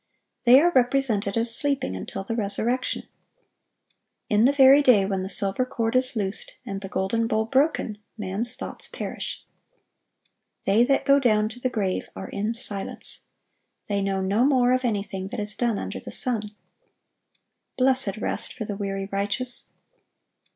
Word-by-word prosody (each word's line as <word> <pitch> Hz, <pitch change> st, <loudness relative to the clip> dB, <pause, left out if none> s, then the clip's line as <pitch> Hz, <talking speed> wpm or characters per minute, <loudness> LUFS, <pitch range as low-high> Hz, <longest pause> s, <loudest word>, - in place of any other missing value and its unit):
They 250 Hz, +2 st, +8 dB
are 345 Hz, +4 st, +4 dB
represented 245 Hz, -6 st, +1 dB
as 230 Hz, 0 st, +3 dB
sleeping 280 Hz, -, 0 dB
until 195 Hz, -, -5 dB
the 225 Hz, +4 st, -3 dB
resurrection.(979) 230 Hz, +4 st, -1 dB, 1.2 s
In 210 Hz, +2 st, +4 dB
the 270 Hz, -, +5 dB
very 275 Hz, 0 st, +7 dB
day 240 Hz, -8 st, +5 dB
when 195 Hz, -1 st, -1 dB
the 190 Hz, -, -4 dB
silver 195 Hz, +4 st, +1 dB
cord 230 Hz, -2 st, -2 dB
is 255 Hz, 0 st, +2 dB
loosed 200 Hz, -2 st, -3 dB
and 195 Hz, 0 st, -5 dB
the 195 Hz, -, -7 dB
golden 200 Hz, +5 st, 0 dB
bowl 220 Hz, 0 st, 0 dB
broken,(980) 265 Hz, -3 st, +1 dB, 0.2 s
man's 215 Hz, +5 st, -2 dB
thoughts 260 Hz, -, -7 dB
perish. -, -, -6 dB, 1.2 s
They 205 Hz, +4 st, +4 dB
that 275 Hz, +1 st, +1 dB
go 280 Hz, 0 st, +5 dB
down 215 Hz, -5 st, +2 dB
to 240 Hz, +2 st, -11 dB
the 255 Hz, -, 0 dB
grave 200 Hz, -6 st, -2 dB
are 190 Hz, -, -7 dB
in 210 Hz, +3 st, -2 dB
silence. 205 Hz, -5 st, -4 dB, 0.6 s
They 200 Hz, -1 st, 0 dB
know 195 Hz, -1 st, -1 dB
no 200 Hz, +5 st, +1 dB
more 255 Hz, -2 st, +4 dB
of 255 Hz, 0 st, +1 dB
anything 200 Hz, -4 st, -2 dB
that 225 Hz, +4 st, -6 dB
is 210 Hz, 0 st, -5 dB
done 235 Hz, -4 st, 0 dB
under -, -, -5 dB
the -, -, -10 dB
sun.(981) 220 Hz, -5 st, 0 dB, 1.3 s
Blessed 255 Hz, -6 st, +2 dB
rest -, -, -2 dB
for 225 Hz, -, -5 dB
the 205 Hz, -, -4 dB
weary 195 Hz, -1 st, -3 dB
righteous! 205 Hz, +6 st, -2 dB
220 Hz, 160 wpm, -25 LUFS, 200-255 Hz, 1.3 s, They